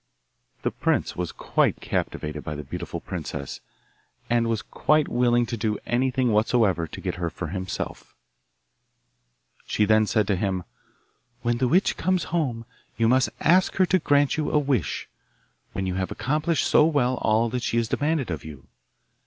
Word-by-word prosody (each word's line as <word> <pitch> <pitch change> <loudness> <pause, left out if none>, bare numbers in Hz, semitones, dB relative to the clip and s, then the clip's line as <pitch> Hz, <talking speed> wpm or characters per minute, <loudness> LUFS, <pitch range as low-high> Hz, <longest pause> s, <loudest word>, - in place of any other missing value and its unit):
The - - 0
prince - - 0
was 90 -2 -3
quite - - 0
captivated 75 -1 -3
by 75 - -4
the 75 - -6
beautiful 65 - -5
princess, - - -6 0.7
and 120 -1 +3
was 115 -2 -1
quite 155 -1 +2
willing 120 0 +2
to 115 - -4
do 105 -1 -1
anything 125 0 +1
whatsoever 105 -5 +2
to - - -9
get - - -3
her 85 - 0
for 80 0 -6
himself. 95 +1 -5 1.5
She 105 - +2
then 110 +1 +4
said 110 0 +2
to 100 - +1
him, 95 -1 -1 0.8
'When 120 0 0
the 130 - +2
witch 180 +10 +2
comes 185 0 +1
home 125 -9 -1 0.3
you 115 - +3
must 130 +2 +3
ask 180 +4 +4
her 185 - +4
to 185 +1 +2
grant 145 -1 +2
you 155 - 0
a - - +2
wish, 135 - 0 0.7
when 95 +1 -2
you 95 - -1
have 95 - -2
accomplished 155 +4 0
so - - +5
well 135 -5 +2
all 110 +2 +2
that 125 +2 -2
she 115 - -1
has 115 -1 +1
demanded 145 - 0
of 80 - -4
you. 75 -4 -10
120 Hz, 170 wpm, -25 LUFS, 95-140 Hz, 1.5 s, so